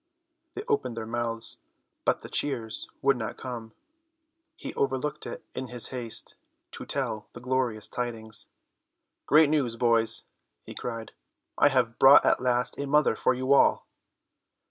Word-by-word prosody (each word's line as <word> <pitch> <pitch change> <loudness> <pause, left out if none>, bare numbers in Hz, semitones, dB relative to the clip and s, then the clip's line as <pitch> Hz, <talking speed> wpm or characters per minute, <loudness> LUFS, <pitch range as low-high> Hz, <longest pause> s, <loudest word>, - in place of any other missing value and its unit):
They 405 - -5
opened 420 - -1
their 110 - -4
mouths, 115 0 -3 0.5
but - - +1
the - - -8
cheers 115 -6 +2
would 135 -1 +3
not 110 -2 -5
come. 120 -3 -7 0.8
He - - -7
overlooked 135 +2 -2
it - - -8
in 130 0 -5
his 125 -1 -1
haste 120 -3 -2 0.4
to - - -8
tell 110 0 -3
the - - -9
glorious 125 -4 -1
tidings. 110 -3 -4 0.8
"Great 150 0 +5
news, 135 -7 0
boys," 115 -1 +2 0.4
he - - -10
cried, 115 -2 -6 0.4
"I - - +5
have 125 -4 +1
brought 135 +2 +8
at - - +3
last 125 -1 0
a 140 - -3
mother 150 -4 +3
for 130 - +1
you 130 +2 +1
all." 140 - +4
125 Hz, 145 wpm, -27 LUFS, 115-135 Hz, 0.8 s, brought